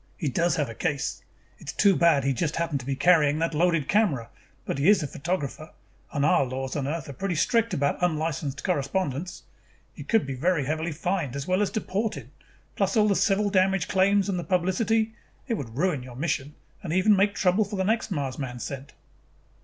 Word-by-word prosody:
He 150 Hz, -, -1 dB
does 170 Hz, +6 st, +1 dB
have 150 Hz, -5 st, 0 dB
a 115 Hz, -, -7 dB
case. 150 Hz, +2 st, -2 dB, 0.4 s
It -, -, -14 dB
is -, -, -4 dB
too 200 Hz, -2 st, +4 dB
bad 165 Hz, -5 st, +4 dB
he 135 Hz, 0 st, +1 dB
just 150 Hz, +4 st, -1 dB
happened 165 Hz, -4 st, -1 dB
to 125 Hz, -, -10 dB
be 135 Hz, -, -1 dB
carrying 150 Hz, -1 st, +4 dB
that 165 Hz, +1 st, -1 dB
loaded 165 Hz, -2 st, +2 dB
camera, 170 Hz, -, +1 dB, 0.3 s
but 140 Hz, -, -3 dB
he 145 Hz, -, +4 dB
is 200 Hz, -5 st, +5 dB
a -, -, -2 dB
photographer 155 Hz, 0 st, -4 dB, 0.4 s
and 145 Hz, -1 st, 0 dB
our 145 Hz, -, +4 dB
laws 130 Hz, 0 st, -4 dB
on 140 Hz, -2 st, -2 dB
Earth 155 Hz, 0 st, -3 dB
are 140 Hz, -, -7 dB
pretty 185 Hz, +6 st, -2 dB
strict 230 Hz, +7 st, +2 dB
about 140 Hz, +4 st, 0 dB
unlicensed 155 Hz, -4 st, -1 dB
correspondents. 175 Hz, 0 st, -2 dB, 0.5 s
You -, -, -9 dB
could 225 Hz, -7 st, +2 dB
be 135 Hz, -, -4 dB
very 150 Hz, +2 st, 0 dB
heavily 160 Hz, +3 st, -2 dB
fined 160 Hz, -3 st, -2 dB
as 140 Hz, 0 st, -4 dB
well 185 Hz, +2 st, +2 dB
as 205 Hz, -, +1 dB
deported, 195 Hz, -, -3 dB, 0.4 s
plus 195 Hz, +3 st, 0 dB
all 215 Hz, -1 st, +5 dB
the 200 Hz, -, +2 dB
civil 205 Hz, +1 st, +2 dB
damage 190 Hz, 0 st, +2 dB
claims 195 Hz, +1 st, +3 dB
and 190 Hz, -3 st, -1 dB
the -, -, -4 dB
publicity. 205 Hz, +6 st, +1 dB, 0.3 s
It 240 Hz, -, 0 dB
would 125 Hz, -, -5 dB
ruin 165 Hz, -4 st, +1 dB
your 125 Hz, -1 st, -10 dB
mission 145 Hz, 0 st, -2 dB, 0.3 s
and 170 Hz, -, -5 dB
even 185 Hz, +4 st, +4 dB
make 200 Hz, +1 st, +2 dB
trouble 190 Hz, +3 st, +3 dB
for 205 Hz, 0 st, -6 dB
the 190 Hz, -, 0 dB
next 220 Hz, +4 st, 0 dB
man 140 Hz, -8 st, -2 dB
Mars 125 Hz, -3 st, -5 dB
sent." 140 Hz, 0 st, -7 dB
165 Hz, 210 wpm, -26 LUFS, 140-190 Hz, 0.5 s, is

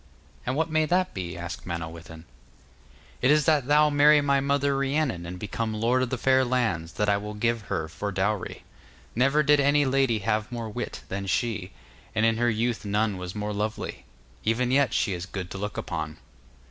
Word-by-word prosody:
'And 130 Hz, -, 0 dB
what 160 Hz, +2 st, 0 dB
may 155 Hz, 0 st, +2 dB
that 185 Hz, +3 st, +1 dB
be?' 90 Hz, -3 st, -5 dB
asked 85 Hz, +1 st, -7 dB
Manawyddan. 80 Hz, -1 st, -6 dB, 1.0 s
'It 125 Hz, -, +3 dB
is 150 Hz, 0 st, +4 dB
that 150 Hz, -5 st, +3 dB
thou 150 Hz, +1 st, +5 dB
marry 150 Hz, +1 st, +6 dB
my 140 Hz, -1 st, +2 dB
mother 140 Hz, 0 st, +1 dB
Rhiannon 135 Hz, -, 0 dB
and 90 Hz, +1 st, -6 dB
become 110 Hz, +3 st, -3 dB
lord 120 Hz, +4 st, +2 dB
of 130 Hz, -, 0 dB
the 130 Hz, -, -2 dB
fair 130 Hz, +1 st, +3 dB
lands 115 Hz, -10 st, -1 dB
that 105 Hz, -, 0 dB
I 100 Hz, -1 st, +3 dB
will 105 Hz, +1 st, -6 dB
give 115 Hz, +2 st, 0 dB
her 80 Hz, -1 st, -1 dB
for 100 Hz, +6 st, -4 dB
dowry. 100 Hz, +1 st, -2 dB, 0.5 s
Never 135 Hz, +5 st, +3 dB
did 150 Hz, 0 st, +5 dB
any 145 Hz, +1 st, +4 dB
lady 135 Hz, -3 st, +2 dB
have 105 Hz, +2 st, -1 dB
more 115 Hz, -2 st, -4 dB
wit -, -, -5 dB
than 100 Hz, 0 st, -4 dB
she, 105 Hz, -2 st, -1 dB, 0.5 s
and 110 Hz, 0 st, +3 dB
in 115 Hz, 0 st, +3 dB
her 120 Hz, +1 st, +2 dB
youth 115 Hz, +1 st, -1 dB
none 105 Hz, -1 st, 0 dB
was 90 Hz, +1 st, -6 dB
more 105 Hz, 0 st, -3 dB
lovely; 105 Hz, +1 st, -3 dB, 0.4 s
even 120 Hz, +3 st, +1 dB
yet 140 Hz, 0 st, +3 dB
she 100 Hz, -, +1 dB
is 90 Hz, 0 st, -5 dB
good 90 Hz, -2 st, -6 dB
to 95 Hz, -, -5 dB
look 105 Hz, +1 st, -4 dB
upon. 80 Hz, -2 st, -4 dB
115 Hz, 195 wpm, -26 LUFS, 95-135 Hz, 1.0 s, marry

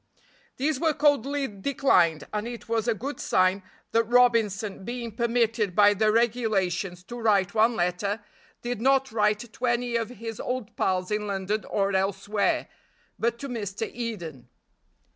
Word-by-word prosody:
These 285 Hz, +1 st, 0 dB
were 315 Hz, -2 st, +1 dB
coldly 285 Hz, -1 st, +2 dB
declined; 195 Hz, -, +2 dB
and 210 Hz, +2 st, -2 dB
it 240 Hz, 0 st, -8 dB
was 225 Hz, 0 st, 0 dB
a 230 Hz, -, +2 dB
good 275 Hz, +7 st, -5 dB
sign 185 Hz, +1 st, +2 dB, 0.3 s
that 230 Hz, 0 st, +3 dB
Robinson, 225 Hz, -5 st, +2 dB
being 235 Hz, +1 st, -5 dB
permitted 230 Hz, -4 st, +1 dB
by 205 Hz, 0 st, +6 dB
the 215 Hz, +1 st, +2 dB
regulations 205 Hz, -6 st, 0 dB
to 240 Hz, +6 st, -8 dB
write 200 Hz, -4 st, +2 dB
one 225 Hz, +2 st, +3 dB
letter, 200 Hz, +4 st, -1 dB, 0.4 s
did 240 Hz, -2 st, -3 dB
not 270 Hz, +1 st, +3 dB
write 215 Hz, +1 st, 0 dB
to 255 Hz, -, -3 dB
any 240 Hz, 0 st, 0 dB
of 230 Hz, -1 st, 0 dB
his 225 Hz, -2 st, -7 dB
old 250 Hz, -3 st, -4 dB
pals 185 Hz, +1 st, 0 dB
in 210 Hz, 0 st, -1 dB
London 200 Hz, +2 st, -2 dB
or 195 Hz, -1 st, 0 dB
elsewhere, 195 Hz, +2 st, 0 dB, 0.5 s
but 235 Hz, +1 st, 0 dB
to 275 Hz, -, -6 dB
Mr. 220 Hz, -3 st, -4 dB
Eden. 170 Hz, -, -6 dB
220 Hz, 150 wpm, -26 LUFS, 200-240 Hz, 0.5 s, by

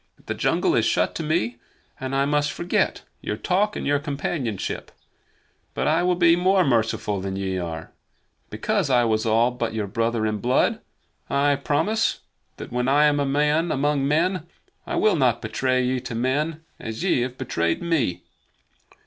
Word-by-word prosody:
The -, -, -2 dB
jungle -, -, +1 dB
is -, -, +3 dB
shut 90 Hz, +1 st, +1 dB
to -, -, -4 dB
me, 120 Hz, -7 st, -1 dB, 0.4 s
and 130 Hz, +1 st, -3 dB
I 135 Hz, 0 st, +2 dB
must 145 Hz, 0 st, +1 dB
forget 175 Hz, -, -1 dB, 0.2 s
your 105 Hz, -, -3 dB
talk 195 Hz, -, 0 dB
and -, -, -4 dB
your 145 Hz, 0 st, +2 dB
companionship. 140 Hz, -, -3 dB, 0.8 s
But -, -, -1 dB
I -, -, +3 dB
will 180 Hz, 0 st, +2 dB
be 170 Hz, -1 st, +5 dB
more 185 Hz, +1 st, +3 dB
merciful 110 Hz, -5 st, 0 dB
than 95 Hz, 0 st, -4 dB
ye 95 Hz, -1 st, -2 dB
are. 80 Hz, -2 st, -6 dB, 0.6 s
Because 190 Hz, -, -1 dB
I 125 Hz, -2 st, +4 dB
was 110 Hz, -1 st, +1 dB
all 115 Hz, +3 st, +3 dB
but 120 Hz, -2 st, -3 dB
your 110 Hz, -2 st, -1 dB
brother 115 Hz, +2 st, -1 dB
in 105 Hz, -1 st, -1 dB
blood, 125 Hz, +5 st, +1 dB, 0.5 s
I 140 Hz, +1 st, +2 dB
promise 200 Hz, +11 st, 0 dB, 0.4 s
that -, -, -8 dB
when 125 Hz, +1 st, -1 dB
I 145 Hz, +2 st, +5 dB
am 145 Hz, -1 st, +3 dB
a 140 Hz, -, 0 dB
man 150 Hz, +4 st, +2 dB
among 140 Hz, 0 st, +1 dB
men 170 Hz, +3 st, +1 dB, 0.4 s
I -, -, -2 dB
will 215 Hz, -, +3 dB
not 125 Hz, -6 st, +2 dB
betray 130 Hz, +3 st, 0 dB
ye 130 Hz, +1 st, 0 dB
to 125 Hz, -2 st, -6 dB
men 150 Hz, +7 st, -1 dB, 0.2 s
as 110 Hz, +7 st, -5 dB
ye 180 Hz, -10 st, +2 dB
have 125 Hz, +1 st, -3 dB
betrayed 85 Hz, -, -1 dB
me." 130 Hz, -, 0 dB
135 Hz, 175 wpm, -24 LUFS, 115-155 Hz, 0.8 s, be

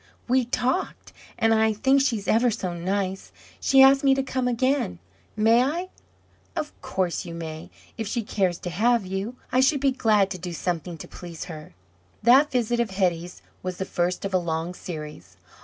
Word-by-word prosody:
"We 255 Hz, 0 st, +3 dB
talked; 255 Hz, +8 st, -2 dB, 0.2 s
and 225 Hz, 0 st, +3 dB
I 220 Hz, 0 st, +3 dB
think 265 Hz, +6 st, +3 dB
she's 230 Hz, -7 st, -1 dB
ever 240 Hz, +2 st, +4 dB
so 190 Hz, -5 st, -3 dB
nice. 190 Hz, +2 st, -3 dB, 0.3 s
She 270 Hz, 0 st, +6 dB
asked 270 Hz, +1 st, +6 dB
me 270 Hz, -1 st, +5 dB
to 270 Hz, -, 0 dB
come 260 Hz, -1 st, -1 dB
again; 255 Hz, -, 0 dB, 0.4 s
may 225 Hz, +2 st, +4 dB
I?" 335 Hz, +8 st, -1 dB, 0.7 s
"Of 305 Hz, -3 st, -3 dB
course 185 Hz, -3 st, -1 dB
you 170 Hz, -1 st, -7 dB
may, 160 Hz, -1 st, -7 dB, 0.3 s
if 220 Hz, -, -2 dB
she 230 Hz, +2 st, -2 dB
cares 190 Hz, -4 st, 0 dB
to 175 Hz, -, -4 dB
have 230 Hz, +3 st, +2 dB
you. 195 Hz, +6 st, -4 dB, 0.2 s
I 255 Hz, -, +3 dB
should 275 Hz, +2 st, +3 dB
be 275 Hz, 0 st, +2 dB
glad 215 Hz, -6 st, +2 dB
to 185 Hz, -, -5 dB
do 175 Hz, 0 st, -5 dB
something 170 Hz, 0 st, -3 dB
to -, -, -9 dB
please 170 Hz, -2 st, -8 dB
her." 155 Hz, -, -10 dB, 0.5 s
That 265 Hz, +6 st, +6 dB
visit 240 Hz, -1 st, 0 dB
of 235 Hz, -2 st, +1 dB
Hetty's 180 Hz, -3 st, -2 dB, 0.2 s
was 185 Hz, -1 st, -4 dB
the 190 Hz, -, -3 dB
first 180 Hz, +1 st, -1 dB
of 195 Hz, -, -4 dB
a 185 Hz, -, +4 dB
long 165 Hz, 0 st, -3 dB
series. 150 Hz, -, -8 dB
205 Hz, 185 wpm, -25 LUFS, 175-250 Hz, 0.7 s, She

